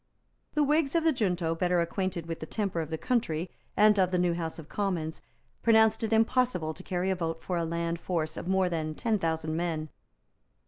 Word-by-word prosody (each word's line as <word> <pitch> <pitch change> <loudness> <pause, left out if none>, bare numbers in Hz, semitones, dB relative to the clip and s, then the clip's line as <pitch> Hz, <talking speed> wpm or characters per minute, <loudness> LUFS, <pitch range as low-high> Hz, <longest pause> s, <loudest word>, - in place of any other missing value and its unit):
The 300 - +4
Whigs 295 +1 +2
of 330 - +3
the 325 - +4
junto, 180 -8 0
better 180 +1 +1
acquainted 175 0 -1
with 165 -1 -5
the 155 - -6
temper 195 -5 -1
of 155 - -5
the 160 - -2
country 180 - -1 0.3
and 210 -1 +6
of 185 -2 +4
the 180 - 0
new 175 -1 +2
House 165 -1 -4
of 160 -3 -9
Commons, 175 -6 -2 0.4
pronounced 220 -1 +4
it 220 - -1
impossible 225 -7 +2
to 185 - -11
carry 185 0 -1
a - - +1
vote 165 -2 -3
for 180 - -2
a 170 -1 0
land 170 0 -2
force 160 -3 -2
of - - -6
more 190 0 +3
than 155 -3 -2
ten 220 +2 0
thousand 160 -2 -1
men. 160 -2 -2
180 Hz, 210 wpm, -29 LUFS, 165-210 Hz, 0.4 s, and